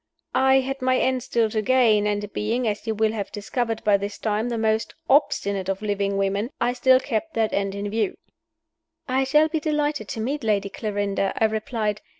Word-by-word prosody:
I 265 0 +4
had 270 +1 -4
my 255 0 +2
end 260 0 +1
still 230 -1 +1
to 215 - 0
gain; 220 -3 +3
and, 205 -1 -2
being 230 +3 -1
(as 210 +1 -3
you 220 - 0
will 220 0 +2
have 210 -3 -4
discovered 225 +2 -3
by 205 -1 +4
this 200 +1 -5
time) 220 +2 -1
the 235 - -2
most 220 0 0
obstinate 200 -9 +2
of 195 +2 -2
living 200 -1 -1
women, 200 +3 0
I 245 +1 +1
still 255 +1 +4
kept 265 +5 -3
that 220 -1 +1
end 195 0 -1
in 200 +1 -3
view. 210 -1 -1 0.9
"I 265 +1 +1
shall 300 +4 +4
be 315 0 -1
delighted 295 -5 -1
to 225 - -5
meet 275 +6 -2
Lady 200 -2 +1
Clarinda," 200 -2 -2
I 225 - +3
replied. 215 -1 -2
220 Hz, 195 wpm, -24 LUFS, 205-255 Hz, 0.9 s, I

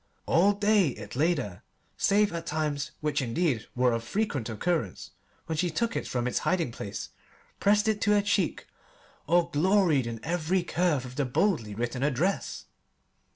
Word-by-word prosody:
All 195 +5 +4
day 205 -2 +3
it 110 -5 -6
lay 165 +6 +3
there, 105 - -5 0.3
save 205 -1 +2
at 165 0 -5
times 150 -2 -1
which, 150 -1 0
indeed, 130 0 0
were 125 0 +3
of 115 0 -1
frequent 145 - -2
occurrence 115 - -2 0.3
when 160 -1 -3
she 180 - +1
took 230 +8 -1
it - - -2
from 120 -1 -2
its 125 - 0
hiding 170 -9 0
place, 100 -3 -6 0.5
pressed 210 +2 +3
it 215 -1 +1
to 210 - +3
her 205 -1 +3
cheek, 200 -4 0 0.6
or 170 +1 +3
gloried 165 - +3
in 115 -1 -5
every 175 +2 0
curve 170 -6 0
of 125 0 -10
the 145 - +1
boldly 125 - 0
written 120 +3 -3
address. 150 +8 -1
160 Hz, 165 wpm, -28 LUFS, 125-190 Hz, 0.6 s, All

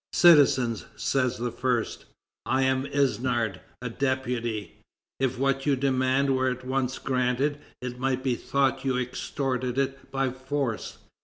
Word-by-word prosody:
"Citizens," 130 - +5
says 130 -2 0
the 120 0 -2
first, 125 -2 -1 0.4
"I 135 0 +2
am 130 +1 +1
Isnard, 120 -7 0 0.2
a 125 - -2
deputy. 125 -5 -2 0.4
If 130 -2 0
what 135 +1 0
you 140 - +4
demand 130 0 +2
were 130 0 +2
at 125 0 -5
once 130 0 -1
granted, 130 +3 0 0.2
it 125 0 -5
might 130 0 0
be 130 - +1
thought 135 +2 0
you 130 -2 +1
extorted 125 0 -2
it 135 0 -2
by 135 -1 0
force. 130 -2 -3
130 Hz, 140 wpm, -27 LUFS, 125-135 Hz, 0.4 s, Citizens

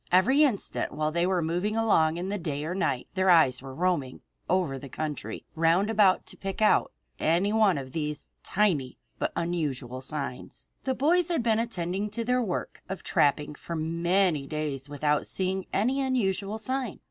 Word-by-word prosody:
Every 210 +11 +5
instant 260 -10 +1
while 155 +1 -1
they 170 +2 +1
were 185 -3 +1
moving 180 +7 -1
along 165 -8 +3
in 180 +2 -3
the 205 0 -2
day 150 -3 -3
or 170 - -2
night 135 -9 -1
their 190 -1 +2
eyes 145 -8 +5
were 135 -1 -9
roaming 165 -7 -1 0.3
over 170 -7 +1
the 140 - -9
country 150 +2 -5
round 165 +6 +2
about 205 -4 +4
to - - -9
pick 195 -1 -5
out 215 - +3 0.3
any 180 +6 +2
one 215 -6 +4
of 130 -2 -6
these 150 -1 -3 0.2
tiny 170 -11 0 0.2
but - - 0
unusual 140 -7 -2
signs. 140 -2 -5 0.2
The 260 -1 0
boys 335 +6 +3
had 335 -8 0
been 225 -1 +2
attending 200 -3 -2
to 230 +2 -3
their 250 +1 +2
work 195 -7 -4
of 190 -2 -5
trapping 145 +1 +1
for 170 +3 -7
many 170 -1 +1
days 145 -3 -4
without 145 0 0
seeing 190 0 -1
any 255 +7 +1
unusual 210 -6 0
sign. 255 -1 -3
180 Hz, 175 wpm, -27 LUFS, 150-210 Hz, 0.3 s, Every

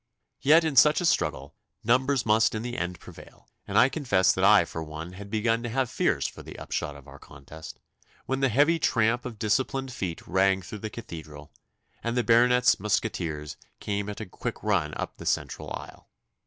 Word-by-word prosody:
Yet 160 +4 +6
in 155 -3 -1
such 150 +4 +6
a 175 - -1
struggle 70 - 0 0.3
numbers 130 +2 +2
must 110 +1 +3
in 110 - -3
the 120 0 -5
end 90 -4 -4
prevail, - - -15 0.2
and - - -1
I 125 - +7
confess 110 - +2
that - - -2
I - - +6
for 80 - -6
one 80 +3 -7
had 100 +2 -10
begun 115 +2 0
to 120 - -4
have 130 0 -1
fears - - 0
for - - -5
the - - -11
upshot 75 - -4
of 70 -2 -14
our - - -13
contest, 75 +3 -12 0.5
when 135 0 -2
the 135 -1 +2
heavy 145 +8 +3
tramp 115 -2 +1
of 120 -3 -6
disciplined 130 +5 -1
feet 90 -8 -5
rang 95 +1 +2
through 105 +4 -8
the 110 - -5
Cathedral, 80 -9 -10 0.5
and 115 +1 -2
the 125 - +2
Baronet's 125 +1 +4
musqueteers 85 -7 -2 0.2
came 100 0 -3
at 105 - -6
a 110 - -5
quick 90 - -6
run 75 -1 0
up - - -5
the - - -10
central - - -2
aisle. - - -9
110 Hz, 195 wpm, -27 LUFS, 90-125 Hz, 0.5 s, I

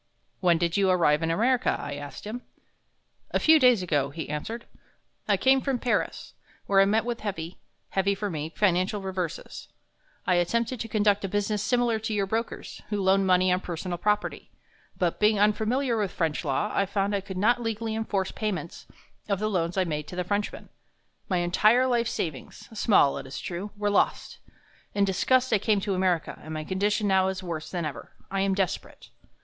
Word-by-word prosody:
"When 175 -3 +3
did 170 +2 0
you 195 -1 +3
arrive 165 -5 +3
in 165 - 0
America?" 240 +9 +2
I 145 - -5
asked 145 +5 -8
him. 230 +4 -5 0.9
"A - - 0
few 315 0 +6
days 250 -7 +5
ago," 145 -6 +1
he 160 +1 -6
answered. 220 +11 -5 0.6
"I - - +3
came 265 0 +4
from 270 -2 0
Paris, 240 -1 -2 0.3
where 195 -1 +4
I - - +6
met 215 +3 +2
with 240 -1 -3
heavy 185 -5 -5 0.3
heavy 195 +1 +1
for 205 +2 -3
me 155 -4 -4
financial 190 +1 +1
reverses. 185 -3 -5 0.6
I 180 -2 +3
attempted 235 +8 0
to 225 - -4
conduct 205 -2 +2
a - - 0
business 205 +1 -1
similar 240 0 +1
to 220 0 -3
your 200 -1 +1
brokers, 225 +4 -4
who 210 -1 -1
loan 190 0 +3
money 185 0 +4
on 180 - +1
personal 175 0 -5
property, 210 +3 -1 0.5
but 175 -2 0
being 210 -1 +3
unfamiliar 225 +5 +2
with 210 -3 0
French 165 -5 -1
law, 150 +9 -1
I 200 - +1
found 200 +1 0
I 200 - 0
could 190 -1 -7
not 240 +5 +3
legally 225 -1 -2
enforce 205 -4 -1
payments 185 -7 -4 0.4
of 200 - +2
the 215 +2 -1
loans 175 -1 -1
I 190 - +4
made 150 -4 -3
to - - -8
the 180 - -1
Frenchmen. 205 +3 -3 0.6
My 185 - +1
entire 210 +8 +4
life 240 -2 +1
savings 155 - -5
small, 205 -9 +3
it - - -9
is 135 - -7
true 185 +4 -5
were 205 0 0
lost. - - 0 0.6
In 200 -1 +3
disgust 255 +7 +2
I 210 - +4
came 210 +1 +2
to 200 0 -1
America, 185 -3 0
and 160 0 -7
my 155 - -3
condition 205 +4 0
now 190 -1 +3
is 190 0 -3
worse 165 -3 -5
than 175 -3 -3
ever. 150 - -7 0.2
I 195 - -1
am 195 0 +1
desperate." 190 -3 -3
195 Hz, 190 wpm, -27 LUFS, 175-215 Hz, 0.9 s, few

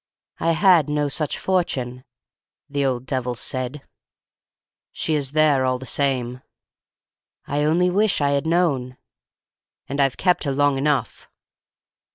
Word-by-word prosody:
"'I 165 0 +2
had 170 -4 +4
no 150 0 0
such 150 +1 -2
fortune,' 130 -9 -1 0.6
the 140 -1 -2
old 130 -2 -1
devil 130 -2 -2
said. 130 +3 -4 1.1
"'She 160 - -2
is 140 -2 -1
there, 150 -3 +3
all 130 0 +1
the 130 - -10
same.' 125 -2 -1 1.0
"'I 145 +1 -1
only 175 +4 +2
wish 205 +2 +2
I 140 -1 +1
'ad 140 +3 -1
known.' 140 -7 0 0.9
"'And 140 +1 -1
I've 135 -1 +1
kept 180 -3 +1
her 140 - 0
long 145 0 +2
enough! 140 -5 -1
140 Hz, 135 wpm, -22 LUFS, 130-155 Hz, 1.1 s, had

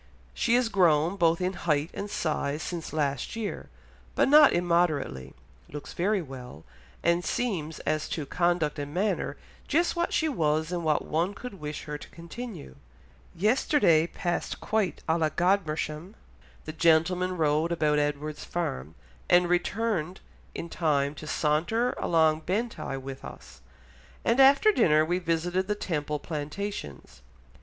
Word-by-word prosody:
she 230 - +2
is 250 -1 +3
grown 175 -4 +3
both 170 -3 +2
in 185 +1 -1
height 155 -2 -1
and 205 - -5
size 155 -4 -2
since 170 -3 -5
last 145 - -2
year, 225 -2 -5 0.5
but - - +3
not 295 +1 +8
immoderately, 160 - 0 0.3
looks 145 0 -8
very 195 +1 0
well, 125 - -10 0.4
and 170 +1 +2
seems 175 -12 -2
as 155 0 -1
to 155 - -3
conduct 170 -1 0
and 145 +2 -6
manner 205 +3 -1 0.3
just 340 +5 +1
what 345 0 0
she 320 - +1
was 160 - 0
and 175 -1 -2
what 155 -2 +1
one 170 +6 -1
could 235 -3 -8
wish 150 0 -5
her 150 -1 -6
to - - -12
continue." 170 - -8 0.6
"Yesterday 210 - +3
passed 175 0 -3
quite 215 -4 -1
à 165 +1 +2
la 155 -1 +2
Godmersham; 170 0 -1 0.5
the 155 - -6
gentlemen 175 +3 +2
rode 155 +1 +1
about 150 -3 +2
Edward's 150 +1 -2
farm, 80 - -4 0.3
and 175 0 +5
returned 180 0 -1 0.4
in 170 - -5
time 145 -4 0
to 155 - -10
saunter 170 +13 +1
along 160 -2 +3
Bentigh 195 - -3
with 135 0 -8
us; - - -11 0.6
and 230 +3 +2
after 275 +10 +7
dinner 155 - +4
we 175 +3 0
visited 175 +2 -1
the 210 - 0
Temple 150 -7 -2
Plantations.... 150 - -6
170 Hz, 145 wpm, -27 LUFS, 150-195 Hz, 0.6 s, not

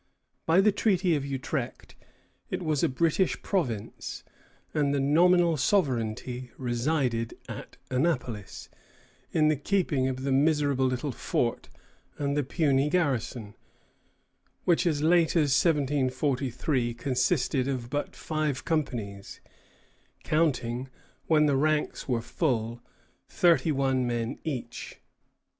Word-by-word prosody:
By 165 +4 +5
the 210 +1 +4
Treaty 190 -4 +2
of 145 - -1
Utrecht 135 -1 -4 0.6
it - - -3
was 155 -3 0
a - - +3
British 165 +7 +1
province, 125 - -3 0.5
and 145 -2 +1
the - - +1
nominal 170 +4 +4
sovereignty 125 - 0
resided 120 -1 -1
at - - -8
Annapolis, 125 - -2 0.6
in 155 -1 +3
the 155 - +3
keeping 145 -4 0
of 130 0 -3
the 135 - -1
miserable 140 -1 +2
little 130 +3 -2
fort - - -2 0.5
and 140 -1 -1
the 145 - +2
puny 140 0 +1
garrison, 125 - -1 1.1
which 175 0 +3
as 150 -3 0
late 170 +1 +4
as 150 -5 +3
1743 135 -4 0
consisted 130 +1 0
of 125 -3 -3
but 145 0 -3
five 155 -4 -2
companies, 115 -11 -3 0.8
counting, 130 -5 0 0.4
when 155 -2 +4
the 145 -2 +2
ranks 150 +2 0
were 120 -2 0
full, 120 -4 -1 0.5
thirty 170 -2 +3
one 135 -3 +1
men 120 +1 -2
each. 140 -7 -5
140 Hz, 115 wpm, -28 LUFS, 125-155 Hz, 1.1 s, By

